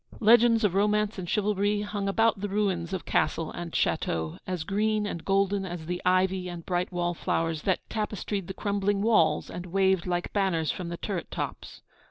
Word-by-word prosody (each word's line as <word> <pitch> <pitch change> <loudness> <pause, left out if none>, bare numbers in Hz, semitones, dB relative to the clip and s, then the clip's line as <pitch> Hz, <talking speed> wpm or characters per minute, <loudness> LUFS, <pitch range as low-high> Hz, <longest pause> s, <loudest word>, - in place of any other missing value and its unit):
Legends 230 +1 +5
of 200 -4 +2
romance 210 +1 +1
and 175 -2 -5
chivalry 205 0 +1
hung 205 -1 -3
about 220 0 +2
the 205 - -2
ruins 190 -4 0
of 190 -2 -4
castle 165 -1 0
and 175 -1 -6
château, 80 - -1
as 180 -3 -2
green 210 +3 0
and 170 -5 -4
golden 195 +1 +1
as 175 -3 -6
the 180 +2 -3
ivy 185 0 +2
and 175 -1 -7
bright 180 +1 -1
wall 175 -1 -1
flowers 165 -1 -1
that 190 +1 -1
tapestried 210 -3 -3
the 190 - -5
crumbling 200 -1 0
walls, 225 0 +3
and 180 +1 -7
waved 190 0 +2
like 175 -1 -2
banners 185 -6 +1
from 180 -2 -5
the 170 - -5
turret 190 -2 -4
tops. - - -6
190 Hz, 185 wpm, -27 LUFS, 175-205 Hz, -, Legends